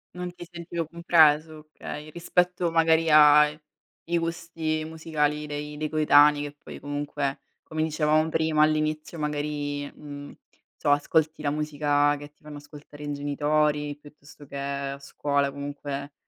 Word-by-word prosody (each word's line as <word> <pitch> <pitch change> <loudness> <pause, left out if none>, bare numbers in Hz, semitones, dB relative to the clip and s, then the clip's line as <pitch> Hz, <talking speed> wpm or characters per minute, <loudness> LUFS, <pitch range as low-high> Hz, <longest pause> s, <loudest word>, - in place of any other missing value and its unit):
Non 180 0 -5
ti 175 0 -10
sentivo 170 -1 -5
compreso, 155 -2 +3
okay, 150 +1 -7
rispetto 175 +1 0
magari 165 0 +3
ai 150 0 +6 0.5
i 170 0 +1
gusti 165 -2 -3
musicali 150 -2 -1
dei 150 0 -6
dei 155 0 -3
coetanei, 150 -1 +5
che 145 0 -7
poi - - -9
comunque, 145 -1 -3 0.2
come 155 0 -3
dicevamo 155 0 +1
prima, 160 -1 +2
all'inizio 155 +1 -1
magari, 145 -1 -2
uhm, 145 -1 -9
non - - -14 0.4
so - - -1
ascolti 155 +2 +1
la 145 - 0
musica 145 -1 +1
che 145 +1 -10
ti 150 - -37
fanno 150 -1 -9
ascoltare 145 0 -12
i 145 - -4
genitori 145 +1 0
piuttosto 145 0 -16
che 140 - -8
a 140 0 -4
scuola, 140 0 -1
comunque 140 0 -6
150 Hz, 145 wpm, -26 LUFS, 145-160 Hz, 0.5 s, ai